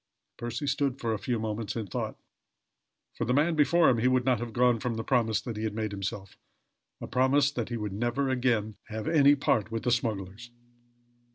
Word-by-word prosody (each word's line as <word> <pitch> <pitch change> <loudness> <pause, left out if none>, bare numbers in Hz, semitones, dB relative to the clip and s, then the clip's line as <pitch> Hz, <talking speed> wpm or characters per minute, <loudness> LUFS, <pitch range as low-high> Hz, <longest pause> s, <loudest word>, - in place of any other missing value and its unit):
Percy 120 +3 -4
stood 140 -2 0
for 115 -2 -1
a 105 - -3
few 120 +4 -1
moments 110 -1 -3
in 115 -2 -3
thought. 95 - -4 1.0
For - - -3
the 125 +3 +1
man 155 +4 +3
before 160 +3 +4
him 120 - +3
he 120 - +2
would 130 -1 +2
not 125 -4 +2
have 120 -1 -5
gone 120 0 +3
from 120 -2 -2
the 115 - -3
promise 115 -3 +1
he 110 -3 -5
had 110 -1 -2
made 110 -1 -2
himself 100 -1 -6 0.6
a - - -6
promise 135 +2 +2
that 120 -5 -4
he 120 - -3
would 105 -3 -4
never 120 +6 -1
again 120 -5 0
have 110 -1 -5
any 145 -3 +5
part 110 -6 +1
with 115 0 -4
the 125 - +1
smugglers. 110 -1 -2
120 Hz, 200 wpm, -28 LUFS, 110-130 Hz, 1.0 s, any